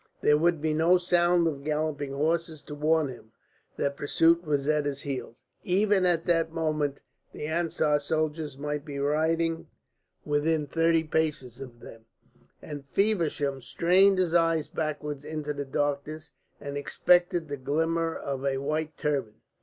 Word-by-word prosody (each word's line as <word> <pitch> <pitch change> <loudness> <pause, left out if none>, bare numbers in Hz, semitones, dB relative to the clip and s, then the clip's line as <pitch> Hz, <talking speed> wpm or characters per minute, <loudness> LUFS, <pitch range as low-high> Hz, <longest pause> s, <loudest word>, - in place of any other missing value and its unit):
There 150 - +5
would 170 -1 +2
be 155 -1 +1
no 165 +4 +4
sound 175 -1 +3
of 145 -4 -2
galloping 150 -2 -2
horses 160 +2 -1
to 150 - -9
warn 155 +1 +2
him 120 -4 -11 0.5
that 140 0 -1
pursuit 165 +4 +3
was 145 -3 -1
at 150 -1 +2
his 140 -1 -3
heels. 130 -4 -6 0.2
Even 195 0 +2
at 170 -2 +1
that 165 -2 +1
moment 155 -3 -1 0.3
the - - -6
Ansar 155 -2 +1
soldiers 155 -1 -2
might 145 0 -3
be 145 -2 -7
riding 160 +3 0 0.6
within 150 +1 +1
thirty 165 +2 +2
paces 150 -6 -2
of 120 -3 -10
them, 115 0 -12 0.6
and 145 -2 -8
Feversham 155 -7 0
strained 185 +8 +3
his 180 -3 +1
eyes 165 -2 +2
backwards 150 -2 -4
into 150 -1 -4
the 145 0 -4
darkness 145 +3 -2 0.3
and 140 0 -5
expected 175 +3 +2
the 145 - -4
glimmer 165 +4 0
of 135 -1 -4
a 135 -1 0
white 155 +2 -2
turban. 135 -7 -1
155 Hz, 150 wpm, -27 LUFS, 145-165 Hz, 0.6 s, There